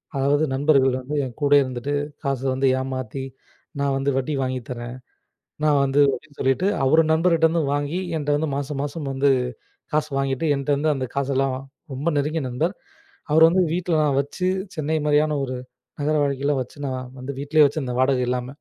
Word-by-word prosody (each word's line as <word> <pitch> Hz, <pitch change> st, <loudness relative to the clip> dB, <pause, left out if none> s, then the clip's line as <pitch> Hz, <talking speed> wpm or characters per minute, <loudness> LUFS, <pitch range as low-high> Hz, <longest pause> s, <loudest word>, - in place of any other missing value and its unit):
அதாவது 140 Hz, +3 st, +2 dB
நண்பர்கள் 135 Hz, -2 st, +3 dB
வந்து 145 Hz, +4 st, -5 dB
என் 125 Hz, -3 st, -8 dB
கூடவே 145 Hz, 0 st, +5 dB
இருந்துட்டு, 130 Hz, +2 st, -4 dB, 0.3 s
காச 135 Hz, -2 st, -1 dB
வந்து 135 Hz, +1 st, +1 dB
ஏமாத்தி, 130 Hz, 0 st, -4 dB, 0.6 s
நான் 140 Hz, -1 st, +1 dB
வந்து 135 Hz, +1 st, 0 dB
வட்டிக்கு 135 Hz, 0 st, -1 dB
வாங்கித்தரேன். 125 Hz, -1 st, -5 dB, 0.7 s
நான் 150 Hz, -2 st, +4 dB
வந்து 135 Hz, +1 st, +1 dB
அப்டினு 150 Hz, -2 st, -9 dB
சொல்லிட்டு, 135 Hz, +9 st, +1 dB, 0.2 s
அவரு 160 Hz, +4 st, +5 dB
நண்பர்கிட்டருந்து 165 Hz, 0 st, +3 dB
வாங்கி, 145 Hz, +5 st, -1 dB, 0.2 s
என்கிட்ட 145 Hz, -1 st, 0 dB
வந்து 155 Hz, 0 st, -1 dB
மாசம் 140 Hz, 0 st, -4 dB
மாசம் 145 Hz, -1 st, -4 dB
வந்து 140 Hz, +1 st, +2 dB, 0.6 s
காசு 155 Hz, 0 st, +1 dB
வாங்கிட்டு, 135 Hz, +2 st, -1 dB
என்கிட்டருந்து 145 Hz, +2 st, +1 dB
அந்த 130 Hz, -1 st, -3 dB
காசெல்லாம் 135 Hz, -1 st, 0 dB, 0.4 s
ரொம்ப 140 Hz, +5 st, -4 dB
நெருங்கிய 150 Hz, +1 st, 0 dB
நண்பர், 160 Hz, +10 st, -1 dB, 0.6 s
அவரு 160 Hz, +1 st, +6 dB
வந்து 185 Hz, +2 st, +3 dB
வீட்ல 175 Hz, -2 st, 0 dB
நான் 140 Hz, -2 st, +1 dB
வச்சு, 180 Hz, +6 st, -3 dB, 0.3 s
சென்னை 155 Hz, 0 st, -1 dB
மாரியான 150 Hz, 0 st, +3 dB
ஒரு 130 Hz, -1 st, -4 dB, 0.4 s
நகர 150 Hz, +2 st, +1 dB
வாழ்க்கைல 140 Hz, +1 st, 0 dB
வச்சு 125 Hz, -, -9 dB
நான் 130 Hz, -1 st, -4 dB
வந்து 130 Hz, +2 st, -5 dB
வீட்டிலே 150 Hz, +1 st, +4 dB
வச்சுருந்தென் 130 Hz, -4 st, -2 dB
வாடகை 130 Hz, -1 st, +2 dB
இல்லாம. 125 Hz, 0 st, -1 dB
140 Hz, 160 wpm, -23 LUFS, 130-155 Hz, 0.7 s, அவரு